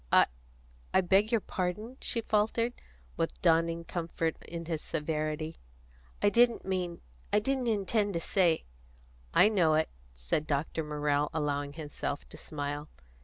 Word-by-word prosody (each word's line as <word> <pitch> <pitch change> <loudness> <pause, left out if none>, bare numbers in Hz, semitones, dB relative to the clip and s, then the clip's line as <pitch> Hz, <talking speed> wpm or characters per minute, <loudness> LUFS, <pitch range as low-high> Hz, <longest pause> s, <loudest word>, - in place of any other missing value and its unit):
"I - - +7 0.7
I - - +7
beg 195 +5 +3
your 230 -3 +3
pardon," 205 +9 -3
she 230 - 0
faltered, 225 +3 +1 0.4
with - - -1
dawning 165 +1 +3
comfort 165 -1 -2
in 170 0 -5
his 160 -2 -2
severity. 155 0 -2 0.7
"I 205 - +6
didn't 235 +2 +4
mean 180 -2 -2 0.3
I - - +4
didn't 255 +3 +1
intend 205 -2 +1
to - - +1
say 170 -1 +2 0.3
" - - -29 0.3
"I - - +8
know 175 -8 +4
it," 160 0 +2 0.2
said 60 - -2
Dr. 155 +2 -1
Morrell, 150 -1 0
allowing 145 -2 -1
himself 145 -2 -4
to - - -10
smile. 145 0 -4
165 Hz, 145 wpm, -31 LUFS, 150-205 Hz, 0.7 s, I